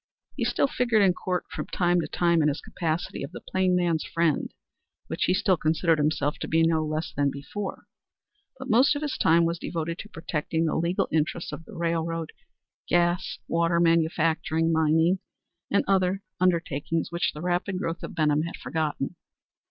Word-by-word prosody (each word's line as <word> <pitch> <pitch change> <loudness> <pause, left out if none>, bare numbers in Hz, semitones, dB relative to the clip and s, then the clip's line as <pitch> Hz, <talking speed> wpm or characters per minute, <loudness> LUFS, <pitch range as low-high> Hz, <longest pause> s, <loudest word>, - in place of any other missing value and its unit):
He - - -1
still - - +2
figured 235 -5 +2
in 185 -2 +4
court 180 0 -2
from - - -5
time 175 -1 +2
to - - -4
time 170 -2 +2
in 150 - +3
his 150 0 0
capacity 165 0 -3
of 140 - -5
the - - -6
plain 185 -1 +1
man's 170 -3 +1
friend, 165 -3 0 0.5
which - - -1
he 180 - +2
still 190 -2 +2
considered 160 +1 +2
himself 150 -1 0
to - - -4
be 165 +1 +3
no 165 -1 +2
less 155 +1 -3
than 140 -1 +2
before, 185 +9 -6 0.7
but 260 0 -7
most 260 +5 +4
of 290 - -3
his 295 - -2
time 165 +1 +4
was 170 0 -1
devoted 165 0 -3
to 210 - -8
protecting 160 -1 -2
the 155 - 0
legal 170 +3 0
interests 160 +2 -1
of 165 - -8
the - - -12
railroad, 165 -1 -2 0.6
gas, 175 +1 +1
water, 170 0 +2
manufacturing, 165 -1 +2
mining 160 +3 +3 0.5
and 200 - +2
other 190 0 +2 0.2
undertakings 165 -3 0
which, 170 0 0
the 150 - -8
rapid 180 +2 -1
growth 165 -2 -3
of - - -7
Benham 150 -2 +2
had 170 +2 -4
forgotten. 155 -1 -3
165 Hz, 175 wpm, -26 LUFS, 160-180 Hz, 0.7 s, in